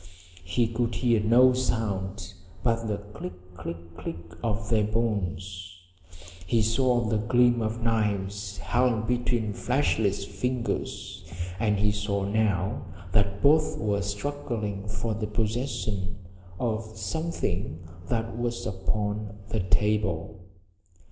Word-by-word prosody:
He 115 +8 +2
could 115 0 -1
hear 115 -1 +3
no 120 +4 +6
sound 100 -6 -1 0.3
but 115 -1 +2
the 105 -1 0
click 90 -3 -9
click 85 0 -7
click 85 0 -6
of 105 0 -1
their 110 -2 +4
bones. 95 -4 -2 0.7
He 115 +3 +3
saw 120 +2 +3
the 110 -1 +1
gleam 120 +2 +4
of 115 +1 -2
knives 105 -3 0
held 115 +4 +2
between 120 -3 +1
fleshless 110 -6 +1
fingers, 115 +5 -2 0.4
and 105 -2 +2
he 105 +1 +3
saw 100 -1 -1
now 100 -3 +1 0.3
that 100 0 +2
both 155 +2 +5
were 100 -2 +1
struggling 105 -2 -3
for 105 +2 -2
the 110 0 -2
possession 105 -3 -1 0.4
of 110 -2 -2
something 95 - -2 0.2
that 115 -1 -1
was 120 0 -2
upon 105 +2 -2
the 110 - 0
table. 100 -1 +1
105 Hz, 115 wpm, -28 LUFS, 100-115 Hz, 0.7 s, no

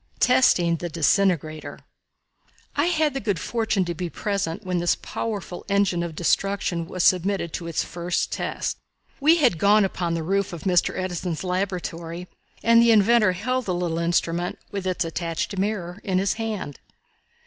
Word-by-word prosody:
Testing 180 -10 +4
the 175 +2 -5
"Disintegrator." 165 -1 +1 1.0
I 290 - +2
had 315 -4 +1
the 270 - -2
good 205 -6 -1
fortune 220 -5 0
to 175 - -2
be 175 +1 -4
present 200 -2 -3
when 180 -1 0
this 175 0 +2
powerful 205 -5 -5
engine 200 -3 +2
of 170 -2 -4
destruction 175 -1 0
was 185 -1 -2
submitted 185 -2 +2
to 170 - -4
its 165 - -1
first 175 +1 -2
test. - - -3 0.4
We 310 +3 +5
had 250 - +3
gone 205 +2 +5
upon 175 -3 -2
the 165 - -2
roof 195 +2 0
of 165 - -7
Mr. 180 -3 +2
Edison's 180 -2 -3
laboratory 180 -2 -3 0.4
and 230 0 +6
the 235 - +5
inventor 215 -2 +5
held 255 +7 -2
the 180 - -1
little 170 -2 -1
instrument, 170 +1 0
with 195 -2 -4
its 180 -2 0
attached 165 +3 -3
mirror, 190 -3 -2
in 190 -2 0
his 195 +1 +1
hand. 215 - -4
185 Hz, 160 wpm, -24 LUFS, 170-205 Hz, 1.0 s, and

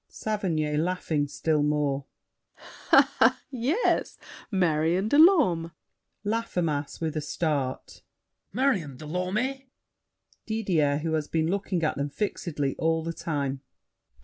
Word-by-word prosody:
SAVERNY 165 -9 -2
(laughing 160 -3 0
still 150 +1 0
more). 145 -2 0 1.5
Yes. 270 - 0 0.3
Marion 175 -1 +1
de 285 +6 +3
Lorme! 185 - +5 0.5
LAFFEMAS 180 -10 -2
(with 160 -2 -2
a 155 - -1
start). 145 -3 -3 0.5
Marion 195 - 0
de 155 - -10
Lorme! 215 - -2 0.8
DIDIER 175 -10 +1
(who 165 -1 -1
has 155 -2 -1
been 160 +1 0
looking 190 -3 -1
at 155 - 0
them 140 +1 -2
fixedly 145 -6 -2
all 160 0 +1
the 165 +1 -3
time). 140 -5 -3
165 Hz, 110 wpm, -27 LUFS, 150-200 Hz, 1.5 s, Lorme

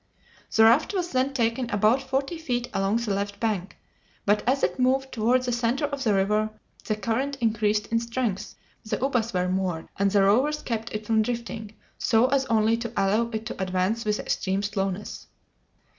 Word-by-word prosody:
The 220 - +6
raft 245 - +4
was 355 -2 -1
then 260 +1 +1
taken 235 -1 0
about 215 +5 +3
forty 275 +5 -2
feet 245 -6 -2
along 195 +3 +1
the 235 -4 -1
left 200 0 -3
bank, 205 -5 -2 0.5
but 210 +1 +3
as 270 +1 +1
it 180 +4 0
moved 265 +1 +2
toward 245 +3 +2
the 250 - -1
center 240 +4 0
of 280 -2 -4
the 215 -5 +2
river 210 +3 +1 0.4
the 215 - 0
current 235 +7 -2
increased 215 -2 +1
in 230 - +3
strength, 230 -4 -3 0.3
the 215 -1 -2
ubas 245 -3 0
were 180 -1 0
moored, 185 -3 -2
and 200 0 +3
the 200 0 +3
rowers 265 +10 +2
kept 225 -2 -3
it 215 0 -5
from 220 0 +3
drifting, 225 -2 -4 0.2
so 225 +1 +3
as 270 0 +2
only 225 0 +3
to 235 -1 -5
allow 215 +4 +2
it 220 -1 -4
to 220 - -5
advance 185 +5 0
with 210 0 0
extreme 195 0 -1
slowness. 200 -1 -3
225 Hz, 185 wpm, -26 LUFS, 205-250 Hz, 0.5 s, The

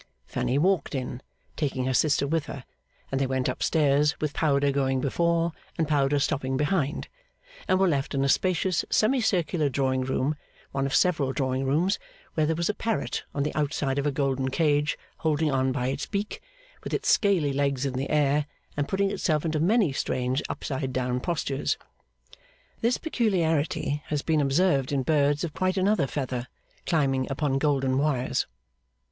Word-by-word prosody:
Fanny 130 - -1
walked 175 -1 +1
in, 125 -1 -4 0.3
taking 135 -4 -1
her 130 - 0
sister 140 +2 +3
with 155 +1 -1
her; 140 - -7 0.5
and 135 0 0
they 135 - +1
went 130 -1 0
up 130 - -3
stairs 150 -1 +2
with 150 -1 -2
powder 140 -2 +2
going 135 -1 +1
before 170 +5 +1 0.3
and 160 - +1
powder 145 -1 +2
stopping 135 -1 0
behind, 150 -1 0 0.6
and 185 - +3
were 190 - +4
left 140 -3 0
in 135 - +1
a - - +2
spacious 185 +3 +1
semicircular 185 - +2
drawing 130 -1 0
room, 130 +3 0 0.4
one 135 0 0
of 135 - -1
several 155 -7 +2
drawing 130 -1 -1
rooms, 165 +9 +1 0.3
where 155 -1 +1
there 160 - +1
was 170 +1 0
a 210 - +1
parrot 225 +1 -2
on 140 - +1
the 150 - -2
outside 145 -2 0
of 140 - 0
a - - +2
golden 135 -1 0
cage 150 +1 +1 0.2
holding 155 -1 +1
on 130 0 +1
by 125 -1 -1
its 135 +2 -3
beak, 205 0 -3 0.4
with - - -2
its - - -3
scaly 180 -9 +3
legs 140 -1 0
in 135 - -1
the 130 +2 -3
air, 150 0 +2 0.3
and 145 -1 -1
putting 195 0 +1
itself 160 -6 0
into 155 -1 0
many 195 - +3
strange 130 +1 -1
upside 130 -1 -3
down 125 -1 -1
postures. 140 -2 -1 1.0
This 235 +2 +2
peculiarity 165 - 0
has 150 -2 -1
been 160 -2 +2
observed 140 -1 +2
in 135 -2 +1
birds 145 +1 +2
of 165 -3 -3
quite 185 +2 0
another 190 -6 +2
feather, 130 -3 -3 0.4
climbing 135 -6 +1
upon 135 -1 0
golden 135 -3 +1
wires. 135 -4 0
145 Hz, 170 wpm, -26 LUFS, 135-165 Hz, 1.0 s, were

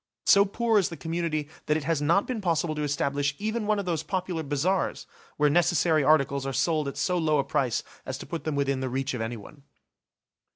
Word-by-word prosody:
So 200 0 +6
poor 225 +2 +2
is 190 - 0
the 170 - -8
community 160 -1 -2 0.2
that 150 - +3
it 155 - -4
has 155 -1 0
not 170 +7 +3
been 245 -4 -3
possible 165 -3 0
to 150 - -4
establish 145 0 0
even 215 +1 -2
one 215 0 +2
of 200 - -3
those 165 -4 -1
popular 180 -3 -3
bazars 155 +6 -1 0.3
where 150 - +4
necessary 165 0 +3
articles 140 -2 +3
are 135 - -3
sold 155 0 +1
at 140 - -5
so 180 +4 +1
low 155 -2 +2
a 140 - +2
price 125 -4 0 0.2
as 130 - -5
to - - -9
put 170 -2 -5
them 155 -2 -2
within 140 -1 0
the 130 0 -2
reach 135 +2 -2
of 125 - -3
anyone. 115 +5 -7
155 Hz, 215 wpm, -27 LUFS, 140-175 Hz, 0.3 s, So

